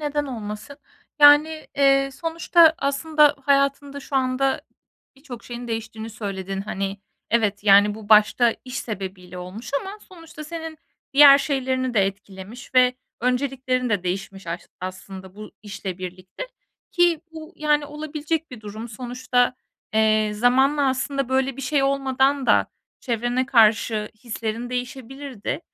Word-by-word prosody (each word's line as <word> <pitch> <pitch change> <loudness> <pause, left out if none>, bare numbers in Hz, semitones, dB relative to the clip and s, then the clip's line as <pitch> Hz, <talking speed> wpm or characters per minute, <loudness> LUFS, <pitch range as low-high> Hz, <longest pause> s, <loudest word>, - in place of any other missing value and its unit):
Neden 295 0 -1
olmasın? 215 +1 -7 0.4
Yani, 300 +2 +6
eee, 275 -1 +4
sonuçta 330 +1 +3
aslında 295 +1 +3
hayatında 280 0 +1
şu 275 - -4
anda 265 +1 +1 0.6
birçok 265 -4 -11
şeyin 240 0 -7
değiştiğini 225 0 -5
söyledin. 195 -3 -5
Hani, 195 0 -4 0.3
evet, 210 -3 +1
yani, 205 0 +6
bu 215 -1 -11
başta 220 +2 +5
iş 255 0 -5
sebebiyle 185 -4 -7
olmuş 195 +6 -8
ama 395 +2 -8
sonuçta 330 -3 -11
senin 320 -1 -7 0.3
diğer 280 0 +9
şeylerini 260 -3 -1
de 210 - +4
etkilemiş 195 +5 -9
ve 250 0 +5 0.3
önceliklerin 255 0 -1
de 200 -4 0
değişmiş 195 +1 -5
aş 170 +2 -4 0.2
aslında, 185 0 -8
bu 215 0 -10
işle 195 -3 -6
birlikte 185 - -8 0.4
ki 345 -3 +3
bu, 320 +2 -10
yani, 300 -1 +1
olabilecek 305 +1 -4
bir 250 -4 -10
durum. 215 +2 -8
Sonuçta, 245 +2 -1 0.4
eee, 215 -1 +3
zamanla 265 +5 +3
aslında, 270 0 -2
böyle 265 0 0
bir 275 - -6
şey 275 +2 +1
olmadan 270 0 +1
da - - +4 0.3
çevrene 240 +2 -1
karşı 220 -3 +3
hislerin 230 +1 -4
değişebilirdi. 255 0 -5
250 Hz, 130 wpm, -23 LUFS, 215-280 Hz, 0.6 s, diğer